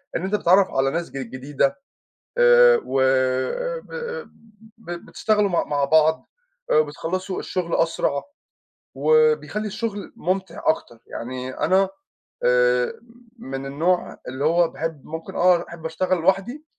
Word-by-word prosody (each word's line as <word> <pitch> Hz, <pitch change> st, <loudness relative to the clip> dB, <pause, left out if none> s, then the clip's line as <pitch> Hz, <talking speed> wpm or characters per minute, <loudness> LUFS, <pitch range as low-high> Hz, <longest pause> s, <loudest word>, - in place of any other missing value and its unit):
إن 170 Hz, -, -2 dB
أنت 195 Hz, +2 st, 0 dB
بتتعرف 190 Hz, 0 st, +4 dB
على 135 Hz, 0 st, +1 dB
ناس 170 Hz, +1 st, -3 dB
ج 135 Hz, -, -7 dB
جديدة، 135 Hz, +2 st, -1 dB, 0.6 s
آآ، 485 Hz, 0 st, +7 dB
و 135 Hz, -, -1 dB
آآ، 130 Hz, -, +1 dB, 1.0 s
ب 175 Hz, -6 st, -10 dB
بتشتغلوا 205 Hz, +4 st, 0 dB
م 170 Hz, -, 0 dB
مع 145 Hz, -1 st, +1 dB
بعض، 160 Hz, +2 st, +3 dB, 0.4 s
آآ، -, -, +4 dB
وبتخلصوا 185 Hz, -, -1 dB
الشغل 175 Hz, -2 st, -2 dB
أسرع، 150 Hz, -3 st, 0 dB, 0.7 s
وبيخلّي 465 Hz, -, +2 dB
الشغل 205 Hz, 0 st, -5 dB
ممتع 185 Hz, -1 st, -3 dB
أكتر. 120 Hz, -7 st, 0 dB
يعني 125 Hz, +2 st, -6 dB
أنا، 190 Hz, +1 st, +3 dB, 0.5 s
آآ، 125 Hz, 0 st, +3 dB, 0.5 s
من 135 Hz, -6 st, -6 dB
النوع 165 Hz, +6 st, 0 dB
اللي 130 Hz, +3 st, -3 dB
هو 170 Hz, +1 st, +4 dB
باحب 160 Hz, -4 st, -5 dB
ممكن 160 Hz, +1 st, -7 dB
آه 175 Hz, -1 st, +4 dB
أحب 165 Hz, -1 st, -10 dB
أشتغل 180 Hz, +3 st, 0 dB
لوحدي، 195 Hz, -, 0 dB
170 Hz, 130 wpm, -23 LUFS, 135-195 Hz, 1.0 s, آآ